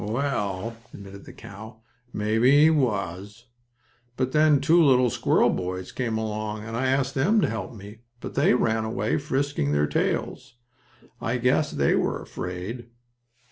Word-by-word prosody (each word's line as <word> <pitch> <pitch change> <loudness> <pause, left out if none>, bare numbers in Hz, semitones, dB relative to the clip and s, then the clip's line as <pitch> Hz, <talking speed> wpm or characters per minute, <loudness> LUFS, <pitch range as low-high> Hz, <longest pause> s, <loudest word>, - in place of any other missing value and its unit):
"Well," 110 -3 -2 0.2
admitted 100 0 -11
the - - -11
cow, 110 +3 -12 0.3
"maybe 110 +4 +1
he 155 - +7
was. 105 - -2 0.7
But 130 0 -1
then 150 -1 +4
two 165 +5 +4
little 125 -4 +4
squirrel - - +2
boys 90 0 -4
came 115 -3 -2
along, 110 -1 -4
and 115 +1 -6
I 130 +2 0
asked 135 0 0
them 175 +11 +2
to - - +2
help 110 +1 -5
me, 105 +1 -11 0.2
but - - -7
they - - +3
ran 110 -2 +1
away, 110 -1 -1
frisking 140 - -1
their 75 0 +2
tails. 95 - -2 0.7
I 120 +2 -1
guess 130 +5 +1
they - - +1
were - - 0
afraid." 95 +7 -6
115 Hz, 150 wpm, -25 LUFS, 105-130 Hz, 0.7 s, he